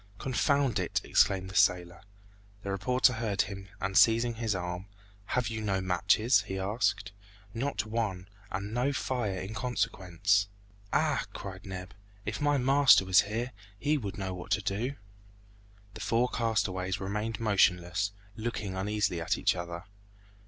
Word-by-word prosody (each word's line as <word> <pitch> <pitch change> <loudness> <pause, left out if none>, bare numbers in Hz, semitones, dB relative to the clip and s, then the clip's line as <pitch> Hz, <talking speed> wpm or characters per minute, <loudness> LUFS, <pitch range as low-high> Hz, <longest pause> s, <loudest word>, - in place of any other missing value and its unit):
"Confound 135 -2 +1
it!" 90 - 0
exclaimed 95 -1 +2
the - - -11
sailor. 90 -1 +2 0.6
The 100 - -3
reporter 125 +6 +3
heard 110 -4 0
him 95 -1 -8
and 95 0 -3
seizing 115 +3 +5
his 110 -2 -1
arm, 90 +1 -4 0.4
"Have 125 0 0
you 110 -1 -4
no 100 -3 0
matches?" 100 +6 +3
he 95 - -3
asked. 105 +1 0 0.4
"Not 115 -3 -2
one, 105 -5 -2 0.2
and 100 +2 -4
no 125 +4 +1
fire 120 -8 -2
in 95 +3 -6
consequence." 100 -5 0 0.4
"Ah!" - - +1
cried 95 0 -8
Neb, 95 0 -7 0.3
"if - - -3
my 145 0 +3
master 135 -5 +6
was 95 0 +6
here, 120 +4 -2 0.3
he 150 +7 +1
would 105 -9 -4
know 95 -2 -3
what 90 +1 -8
to 105 - +1
do!" 110 +8 -2 1.0
The 110 - -9
four 115 +5 +1
castaways 100 -5 -1
remained 105 +3 -3
motionless, 95 -2 +2 0.2
looking 110 -4 -4
uneasily 95 -2 -1
at 80 - 0
each - - +2
other. 85 0 -5
105 Hz, 145 wpm, -30 LUFS, 95-115 Hz, 1.0 s, master